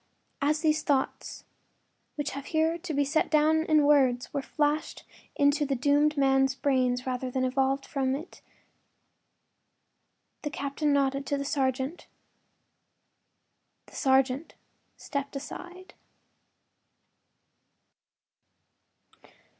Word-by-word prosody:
” - - -45
As 305 0 -1
these 310 -1 +2
thoughts, 275 -3 -2 0.7
which 290 -1 -3
have 280 0 -7
here 320 +1 +1
to 350 0 -6
be 285 -1 +1
set 305 +3 +1
down 315 +1 +3
in 305 -2 +4
words, 260 -4 +3
were 280 - -1
flashed 295 +2 -1 0.3
into 285 +1 +3
the 275 -1 -1
doomed 290 +3 +2
man’s 270 -1 +3
brain 255 -3 +1
rather 255 0 -3
than 255 +1 -1
evolved 270 +1 0
from 265 -2 -1
it 315 +6 -9 2.0
the 295 - -3
captain 290 +1 -2
nodded 275 -1 +1
to 285 - 0
the 280 - -4
sergeant. 270 +2 -2 1.8
The - - -17
sergeant 265 +1 +1 0.4
stepped 280 0 -5
aside. 360 +6 -9
280 Hz, 105 wpm, -28 LUFS, 270-300 Hz, 2.0 s, in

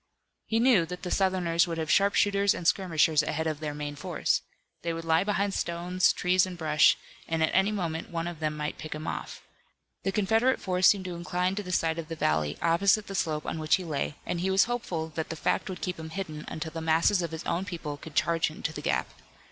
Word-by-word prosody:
He 225 - +1
knew 230 -9 +4
that 180 +1 -7
the 180 - -4
Southerners 180 -3 +2
would 165 -1 -3
have 160 -2 -1
sharpshooters 200 0 +3
and 170 - -3
skirmishers 160 -6 +3
ahead 155 +1 -2
of 155 -2 -2
their 150 -2 -4
main 145 0 -5
force. 145 - 0 0.4
They 170 - -2
would 165 0 -6
lie 165 +1 +3
behind 200 -1 0
stones, 175 +1 +1
trees 185 +1 +2
and 180 -1 -7
brush 155 -2 +4 0.3
and 165 -1 0
at 160 - +2
any 195 +2 +3
moment 170 -6 -3
one 165 -1 -3
of 175 -2 -5
them 155 -1 -2
might 150 0 -4
pick 155 0 -6
him 155 +1 -6
off. - - -5 0.6
The 195 - -1
Confederate 225 +6 +2
force 185 0 +3
seemed 195 -2 +3
to 180 - -4
incline 180 +2 -1
to 205 - -3
the 180 -2 -7
side 165 -2 +1
of 160 - -6
the 165 - -5
valley, 75 - 0
opposite 195 +5 +3
the 195 - -7
slope 155 -5 -1
on 160 - -3
which 155 0 +3
he 190 - -4
lay, 150 -3 -2
and 175 - -2
he 185 +2 0
was 190 +1 +5
hopeful 185 -10 -3
that 160 0 -4
the 165 - -4
fact 155 - -1
would 185 -2 -6
keep 180 -2 -3
him 160 0 -7
hidden 160 -4 -5
until 160 0 -5
the 165 - -5
masses 165 +4 +3
of 170 - -2
his 160 0 -6
own 170 +2 0
people 165 -6 -5
could 150 +1 -11
charge 165 0 +2
into 155 0 -5
the 150 - -6
gap. - - 0
170 Hz, 235 wpm, -28 LUFS, 160-190 Hz, 0.6 s, was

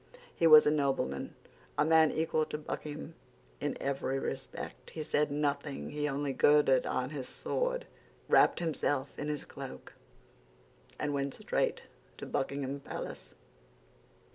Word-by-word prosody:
He 165 - +3
was 155 -1 +10
a 150 - +4
nobleman, 135 - -1 0.4
a - - +4
man 160 0 +6
equal 160 -1 +1
to - - -3
Buckingham 150 +1 -6 0.5
in 145 - -2
every 135 -1 -1
respect. - - -5
He 155 - -5
said 150 0 +1
nothing; 145 -1 -2
he 150 0 -1
only 140 0 -1
girded 145 -2 +4
on 130 +2 -1
his 135 -4 -5
sword, - - -2 0.4
wrapped - - +5
himself 145 -4 0
in 145 - -3
his 150 -1 -3
cloak, 65 - -9 1.0
and 150 -1 -1
went 140 -1 -1
straight - - -1 0.3
to - - -6
Buckingham 140 0 -2
Palace. 135 - -7
145 Hz, 135 wpm, -32 LUFS, 140-150 Hz, 1.0 s, was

